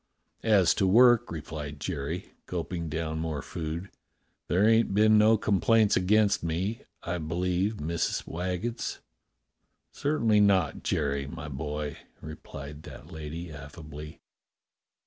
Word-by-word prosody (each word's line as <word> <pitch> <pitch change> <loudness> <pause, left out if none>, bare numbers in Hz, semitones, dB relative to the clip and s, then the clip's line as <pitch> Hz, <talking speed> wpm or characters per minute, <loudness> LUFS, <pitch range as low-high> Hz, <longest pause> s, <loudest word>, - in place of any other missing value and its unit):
"As 100 -6 +4
to 95 - +4
work," 120 +3 +6
replied 75 -2 -6
Jerry, 80 +2 -4
gulping 85 -1 -3
down 80 0 -3
more 80 -4 -3
food, 85 +3 -5 0.6
"there 95 +5 +3
ain't 115 -3 +3
been 110 +1 +6
no 110 +1 +6
complaints 105 +1 +3
against 105 +2 +3
me, 90 +7 -2 0.2
I 85 +1 -2
believes, 90 +6 -1
Missus 85 +3 -1
Waggetts.^" 90 +7 -3 0.9
"Certainly 115 -8 +2
not, 100 -2 +3
Jerry, 70 -2 -1
my 75 +1 -7
boy," 75 +1 -4 0.2
replied 75 -1 -9
that - - -11
lady 80 +2 -6
affably. 75 +1 -9
85 Hz, 115 wpm, -28 LUFS, 75-105 Hz, 0.9 s, work